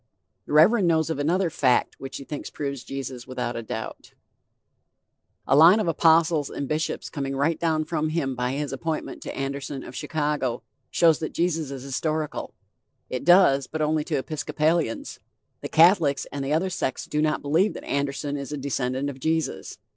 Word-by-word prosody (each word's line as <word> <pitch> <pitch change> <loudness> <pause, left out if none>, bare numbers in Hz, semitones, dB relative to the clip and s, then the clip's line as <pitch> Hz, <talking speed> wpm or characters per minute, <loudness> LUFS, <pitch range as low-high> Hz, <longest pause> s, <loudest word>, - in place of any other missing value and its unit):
The - - -5
Reverend 180 +6 +5
knows 160 -1 +2
of 145 - -3
another 170 +4 +1
'fact' 130 -4 +1
which 135 0 -6
he - - -8
thinks 145 +1 -6
proves 140 -3 -5
Jesus 130 -3 -6
without 125 -2 -3
a 115 - -3
doubt: 110 0 -7 1.3
"A 135 - +4
line 165 +8 +8
of 210 - -1
apostles 160 -2 +3
and 140 - -4
bishops 155 +2 -2
coming 135 -2 -4
right 145 +4 +1
down 160 -2 +1
from 155 -1 -1
him 155 -4 -1
by 125 0 -2
his 145 0 -3
appointment 160 +3 -4
to - - -7
Anderson 135 0 -4
of 125 - -10
Chicago," 150 -5 -2 0.3
shows 165 -2 +4
that 155 - -4
Jesus 165 -4 0
is 135 -2 -7
historical. 155 +3 -3 0.6
It 125 - -3
does, 165 -6 +5
but 155 0 -2
only 155 0 +1
to 150 - -1
Episcopalians. 155 -1 -1 0.4
The - - -5
Catholics 160 -5 +4
and 140 -1 -4
the 135 - -3
other 185 +4 +1
sects 130 -7 -2
do 150 - -1
not 155 0 0
believe 165 +7 +2
that - - -8
Anderson 140 +1 -2
is 140 0 -6
a 150 - -3
descendant 135 -1 -2
of 140 -2 -6
Jesus. 160 +3 -2
150 Hz, 175 wpm, -25 LUFS, 135-160 Hz, 1.3 s, line